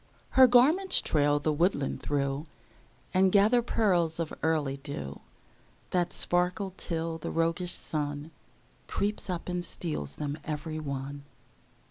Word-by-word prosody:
Her 260 -1 +7
garments 300 +11 +5
trail 145 -1 +2
the 150 +1 0
woodland 155 -2 0
through, 140 +1 -2 0.7
And 190 0 +4
gather 215 +5 +5
pearls 180 -9 +1
of 165 -2 -3
early 150 -4 0
dew 135 - -7 0.7
That 175 -1 +1
sparkle 180 +2 +1
till 165 -2 -3
the - - -5
roguish 165 +2 0
Sun 145 0 -4 0.6
Creeps 205 0 -1
up 175 -2 -3
and 180 -1 -2
steals 110 - -4
them 145 +1 -4
every 155 +1 -4
one. 140 -1 -5
165 Hz, 125 wpm, -29 LUFS, 145-185 Hz, 0.7 s, Her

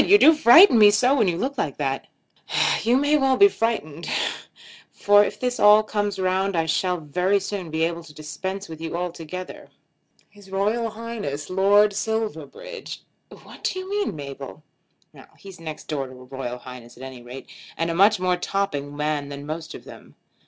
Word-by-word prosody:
You 405 +3 +6
do 320 -5 +7
frighten 300 - +7
me 210 -1 +8
so 245 +6 +3
when 225 -8 +2
you 170 -2 0
look 275 +8 -3
like - - -2
that." - - -3 0.7
"You 240 +3 +2
may 290 +2 +2
well 270 -2 +2
be 400 - +8
frightened, 170 - -3 0.8
for 205 0 +4
if 210 0 -4
this 250 +1 -2
all 210 +1 +7
comes 205 -2 -2
round 190 +1 0
I 165 -1 +1
shall 180 +3 0
very 180 +6 0
soon 195 -3 -5
be 160 +1 -1
able 170 0 -2
to 155 - -13
dispense 190 +6 -6
with 160 -1 -10
you 165 +1 -4
altogether. 180 0 -7 0.6
His 205 -2 -18
Royal 210 +4 -1
Highness 215 -10 -6
Lord 200 +2 +4
Silverbridge 220 - -5 0.2
" - - -18
"What - - -15
do - - -1
you 370 0 -6
mean, 405 - -2
Mabel?" 140 0 -9 0.7
"He's 195 -3 -13
next 160 -2 -7
door 140 -4 -3
to 130 - -12
a 125 0 -13
Royal 125 -1 -6
Highness 125 -1 -12
at 130 - -11
any 130 -2 -9
rate, 125 +2 -10 0.3
and 165 +1 -1
a - - -2
much 195 +3 +4
more 180 -1 +1
topping 150 -7 -3
man 150 -1 -2
than 140 0 -8
most 155 +1 -6
of - - -11
them. - - -14
190 Hz, 185 wpm, -23 LUFS, 155-215 Hz, 0.8 s, me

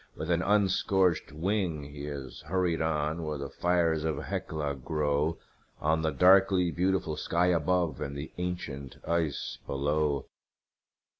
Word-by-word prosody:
With 80 +3 -3
an 85 0 +2
unscorched 95 -5 +2
wing 85 -1 -1
he 70 0 -8
has 70 -3 -7
hurried 90 -1 +1
on, 80 0 0
where 75 -1 -3
the 70 -1 -6
fires 85 -3 +1
of 80 -2 -1
Hecla 75 -3 -3
glow 75 +3 0 0.4
On 80 +1 +1
the 80 - +1
darkly 95 0 +5
beautiful 90 -3 0
sky 85 +3 +1
above 85 -2 +1
and 70 +1 -4
the 75 +2 -6
ancient 75 -7 -4
ice 85 -4 -1
below. 75 0 0
80 Hz, 135 wpm, -29 LUFS, 75-90 Hz, 0.4 s, darkly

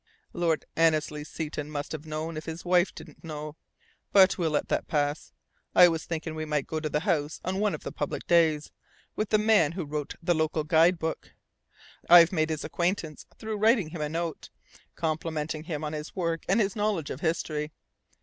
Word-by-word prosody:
"Lord 165 -3 0
Annesley 155 -2 +2
Seton 150 -1 -5
must 145 -1 -5
have 155 0 -6
known, 155 +1 -4
if 155 - -6
his 165 +1 -6
wife 180 +1 +3
didn't - - -13
know. 155 -1 -6 0.6
But 190 -1 +6
we'll 170 -3 0
let 150 - 0
that - - -1
pass. 145 0 -1 0.4
I 180 - +9
was 165 -1 -3
thinking 165 -1 -4
we 155 0 -4
might 150 -3 -1
go 160 - -3
to 155 0 -3
the 150 0 0
house 160 -4 -1
on 190 +2 -1
one 210 -1 +1
of - - -11
the - - -5
public - - -4
days, 160 -3 +3 0.4
with 215 - -2
the 215 - +4
man 210 -8 +3
who 175 -2 -4
wrote 150 0 -4
the 175 +1 +1
local 155 -1 0
guide 165 +3 +4
book. 160 -1 -4 0.8
I've 170 -1 +9
made 160 -3 +1
his 155 -1 -3
acquaintance 170 -3 -2
through 220 -1 -4
writing 215 -5 +3
him 160 -1 -6
a 150 - -1
note, 165 +1 -4 0.5
complimenting 155 -1 -3
him 155 -2 -4
on 150 0 -3
his 150 0 -6
work 165 -3 -2
and 195 +5 +4
his 200 -3 +1
knowledge 205 -8 -1
of 130 - -5
history. 155 -2 -1
160 Hz, 195 wpm, -28 LUFS, 155-175 Hz, 0.8 s, I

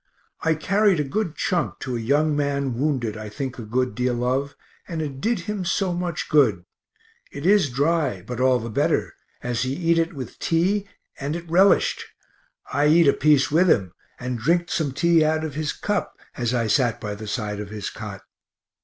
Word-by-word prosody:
I 160 0 +2
carried 195 +2 +2
a - - +2
good 165 +4 -2
chunk 175 -2 -1
to 130 -2 -3
a - - -2
young 145 +6 +2
man 140 -2 0
wounded 125 -4 -1
I 110 -1 -7
think 130 +2 -5
a - - -5
good 125 +2 -1
deal 125 +1 -1
of, 135 +3 -1 0.3
and 165 -2 -4
it 140 -4 -4
did 225 -1 0
him 205 +2 -4
so 180 +1 0
much 175 -2 -3
good 110 - +3 0.7
it 140 +2 -7
is 195 -5 +4
dry, 140 - 0
but 125 +3 -6
all 130 0 +4
the 115 -1 -5
better, - - 0 0.3
as 120 -1 -1
he 130 +2 -1
eat 165 0 +2
it 165 0 0
with 130 -3 -8
tea 190 +5 +1 0.3
and 145 +3 -3
it 170 0 -7
relished. 185 +4 +3 0.7
I 145 +1 +3
eat 165 +1 +5
a 140 - +6
piece 150 -2 +3
with 175 +4 +4
him, 95 - +2 0.3
and 125 -1 -3
drinked 170 +8 +1
some 150 -4 0
tea 165 +4 +3
out 155 0 +1
of 155 -3 -4
his 150 +1 -2
cup, 205 -1 -3 0.2
as 120 -2 -1
I 120 -2 +1
sat 120 +1 +2
by 105 -2 -4
the 105 +1 -8
side 105 -2 -3
of 105 -1 -6
his 105 -1 -5
cot. 105 -3 -8
140 Hz, 195 wpm, -23 LUFS, 120-165 Hz, 0.7 s, a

